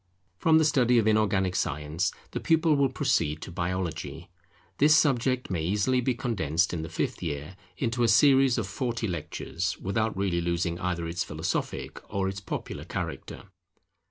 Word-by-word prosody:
From 160 -1 +5
the 160 - +4
study 125 -5 +3
of 115 - +3
inorganic 100 -4 +2
science, 75 +5 -1 0.2
the - - -3
pupil 160 -1 +3
will 140 -1 +3
proceed 85 - 0
to - - -8
Biology: 90 -1 -4 0.5
this 150 +2 +6
subject 130 -5 +1
may 85 -3 -1
easily 105 +8 +1
be 125 0 0
condensed 90 - 0
in 85 - -2
the 80 - -6
fifth 85 - -3
year 75 +5 -4 0.2
into 120 -1 -1
a 120 - +4
series 135 +2 +5
of 115 - -1
forty 115 +2 -2
lectures, 85 +1 -3
without 110 +2 -1
really 95 -3 0
losing 85 0 -1
either 85 -2 -2
its 85 +1 -2
philosophic - - -3
or 95 -1 0
its 95 +1 -4
popular 100 - -5
character. - - -5
100 Hz, 160 wpm, -27 LUFS, 85-125 Hz, 0.5 s, this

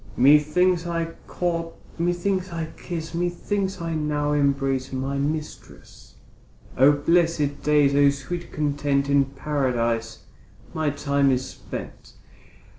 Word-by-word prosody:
Methinks 155 +6 +4
I 165 -1 -2
court, 165 -2 -2 0.2
methinks 180 +2 0
I 165 -1 -4
kiss, 165 -2 -6
Methinks 185 +3 -2
I 165 -1 -3
now 150 -1 -1
embrace 135 -2 0
my 135 +1 -2
mistress. 150 +2 -6 0.6
O 135 +3 +6
blessed 150 -1 +1
days, 145 -2 +3
O 140 0 +5
sweet 170 +5 -5
content, 145 -2 0
In 140 -1 +4
Paradise 125 -5 -2 0.5
my 155 -2 0
time 140 -1 +1
is 130 0 +1
spent. - - -9
150 Hz, 115 wpm, -24 LUFS, 140-170 Hz, 0.6 s, O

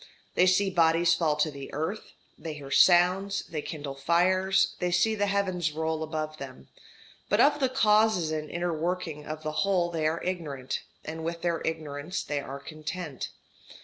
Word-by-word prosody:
They 180 - +4
see 190 +1 +3
bodies 165 -1 +4
fall 160 -2 +1
to 150 +1 +1
the 140 -1 -9
earth, 160 +8 -4 0.2
they 160 -2 -6
hear 140 -2 -9
sounds, 185 +5 +4
they 155 -3 -4
kindle 145 -2 -6
fires, 185 +6 +2
they 180 - 0
see 175 +5 +3
the 205 -1 0
heavens 185 -5 0
roll 160 0 -2
above 155 -1 -3
them, 135 -2 -10 0.6
but - - +2
of 295 +1 +5
the 265 -2 +2
causes 215 -8 +3
and 155 -1 -3
inner 175 0 -2
working 160 -2 -3
of 155 0 -6
the 155 - -2
whole 180 -3 +1
they 160 -2 0
are 160 +2 -2
ignorant, 150 -8 -3 0.2
and 160 +1 -5
with 170 +1 -4
their 170 -2 0
ignorance 155 +1 -3
they 145 -1 -2
are 140 0 -7
content. 155 0 -6
165 Hz, 175 wpm, -28 LUFS, 155-185 Hz, 0.6 s, of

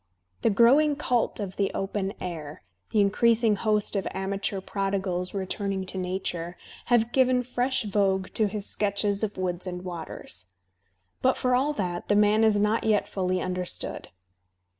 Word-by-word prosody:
The - - +3
growing 270 +8 +5
cult 250 -6 0
of 195 -3 -5
the 200 -1 +1
open 195 0 -2
air, 155 - -6 0.3
the 210 - +3
increasing 225 +2 +3
host 210 0 0
of 195 - 0
amateur 195 +1 -2
prodigals 190 -2 -2
returning 195 0 -2
to 190 - -7
nature, 180 -2 -3 0.3
have 240 -1 +3
given 255 -1 +3
fresh 250 +1 0
vogue 195 -2 0
to 215 - +2
his 205 0 -4
sketches 200 0 0
of 210 -1 -2
woods 180 0 -2
and 180 0 -5
waters. 155 - -6 0.7
But, 260 0 +3
for 255 0 +1
all 275 +4 +2
that, 180 -8 -3
the 205 - +3
man 210 +1 +4
is 220 -1 +4
not 210 +2 +2
yet 215 -2 +2
fully 185 -1 -1
understood. 180 -1 -3
200 Hz, 155 wpm, -27 LUFS, 185-220 Hz, 0.7 s, growing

